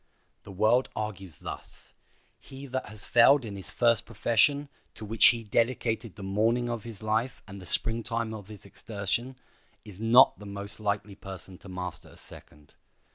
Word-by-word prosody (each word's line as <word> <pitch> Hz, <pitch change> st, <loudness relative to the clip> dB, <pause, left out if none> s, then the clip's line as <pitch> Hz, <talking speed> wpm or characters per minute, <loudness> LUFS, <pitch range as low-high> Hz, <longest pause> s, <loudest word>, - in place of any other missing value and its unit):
The 100 Hz, -, -9 dB
world 110 Hz, +6 st, +3 dB
argues 95 Hz, -5 st, -5 dB
thus: -, -, -9 dB, 0.5 s
he 135 Hz, +1 st, -11 dB
that 130 Hz, -1 st, -4 dB
has 110 Hz, -1 st, -8 dB
failed 125 Hz, +2 st, +5 dB
in 105 Hz, -2 st, -6 dB
his 95 Hz, -, -3 dB
first 115 Hz, -3 st, +2 dB
profession, 120 Hz, +6 st, +2 dB, 0.3 s
to 110 Hz, -, -8 dB
which 110 Hz, +2 st, +6 dB
he 115 Hz, -2 st, +3 dB
dedicated 115 Hz, -1 st, 0 dB
the 100 Hz, -, -9 dB
morning 115 Hz, +5 st, +1 dB
of 115 Hz, -2 st, -5 dB
his 115 Hz, -3 st, -8 dB
life 110 Hz, +4 st, -1 dB
and 95 Hz, 0 st, -9 dB
the 90 Hz, -, -8 dB
Spring 115 Hz, 0 st, +3 dB
time 115 Hz, -1 st, -3 dB
of 105 Hz, -3 st, -8 dB
his 105 Hz, -2 st, -12 dB
exertion, 110 Hz, +5 st, -4 dB, 0.5 s
is 100 Hz, -2 st, -12 dB
not 115 Hz, +4 st, +6 dB
the 105 Hz, -, -10 dB
most 100 Hz, +2 st, -4 dB
likely 105 Hz, -1 st, -2 dB
person 95 Hz, -1 st, -10 dB
to 100 Hz, -, -13 dB
master 90 Hz, -2 st, -6 dB
a -, -, -17 dB
second. 75 Hz, -1 st, -12 dB
110 Hz, 175 wpm, -28 LUFS, 100-115 Hz, 0.5 s, which